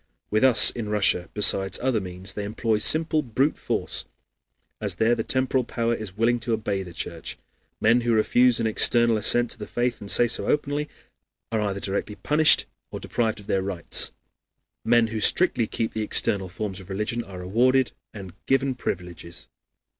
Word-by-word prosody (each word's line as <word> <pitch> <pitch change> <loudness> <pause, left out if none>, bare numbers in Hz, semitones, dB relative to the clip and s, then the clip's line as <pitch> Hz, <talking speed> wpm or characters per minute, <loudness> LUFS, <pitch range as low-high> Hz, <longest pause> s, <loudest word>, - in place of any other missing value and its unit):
With 110 +4 +1
us 130 -3 +6
in 110 -3 -6
Russia, 95 -4 +1
besides 95 -2 +3
other 125 -4 0
means, 90 +1 -7
they 105 - -5
employ, 110 +1 -1
simple 155 +6 +3
brute 135 +3 0
force, - - -2 0.8
as - - 0
there 115 +2 +2
the 115 -2 -2
temporal 130 +1 0
power 115 0 -2
is 105 -4 -6
willing 120 +2 +1
to 115 0 -2
obey 100 -3 -2
the 90 -2 -9
Church. 85 -1 -6 0.4
Men 115 +3 +3
who 120 0 -1
refuse 120 +2 +3
an 115 - -1
external 115 +1 +3
assent 120 +3 +2
to - - -4
the 105 - -7
faith, 120 0 -2
and 100 - -8
say 120 - +4
so 110 -3 0
openly, 150 0 -1 0.6
are 110 -1 0
either 100 -2 -2
directly 100 +2 -4
punished 150 +10 +3 0.2
or - - -7
deprived 110 -2 -2
of 100 - -13
their 95 - 0
rights; 95 -3 0 0.7
men 120 0 +3
who 110 0 -4
strictly 120 - +2
keep 115 +1 -3
the 110 - -3
external 100 -2 0
forms 95 +1 -6
of 95 0 -14
religion 105 +4 -3
are 95 -3 -11
rewarded 120 +8 +1 0.2
and 95 -4 -10
given 135 0 +1
privileges. 90 -7 -7
110 Hz, 175 wpm, -24 LUFS, 100-120 Hz, 0.8 s, us